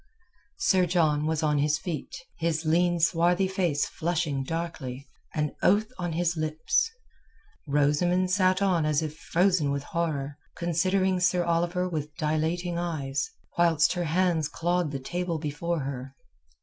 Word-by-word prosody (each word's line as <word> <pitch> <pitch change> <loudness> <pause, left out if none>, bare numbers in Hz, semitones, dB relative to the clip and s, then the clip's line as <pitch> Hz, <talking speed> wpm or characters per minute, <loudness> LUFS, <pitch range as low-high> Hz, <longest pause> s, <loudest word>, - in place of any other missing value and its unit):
Sir 190 - +3
John 155 -4 +2
was 160 -1 0
on 150 -1 +2
his 150 +1 +2
feet, 160 0 -5 0.2
his 165 -1 -1
lean 175 +2 +2
swarthy 170 +3 +3
face 175 -6 0
flushing 160 -5 -1
darkly, 140 -4 -5 0.3
an 150 -1 0
oath 215 +5 +3
on 175 -2 -2
his 175 +1 0
lips. 155 - 0 0.8
Rosamund 150 +6 +2
sat 185 0 +3
on 180 -5 +2
as 155 +1 +1
if 155 -1 -4
frozen 175 -3 +1
with 140 0 -1
horror, 145 -3 -3 0.2
considering 185 +2 +1
Sir 180 0 +2
Oliver 175 +2 0
with 150 -3 -4
dilating 165 +2 -1
eyes, 140 -6 -2 0.3
whilst 170 -1 +4
her 175 -1 -2
hands 165 -1 +1
clawed 175 0 0
the 140 - -3
table 175 +5 -3
before 155 +2 -2
her. 135 0 -6
165 Hz, 140 wpm, -27 LUFS, 150-180 Hz, 0.8 s, whilst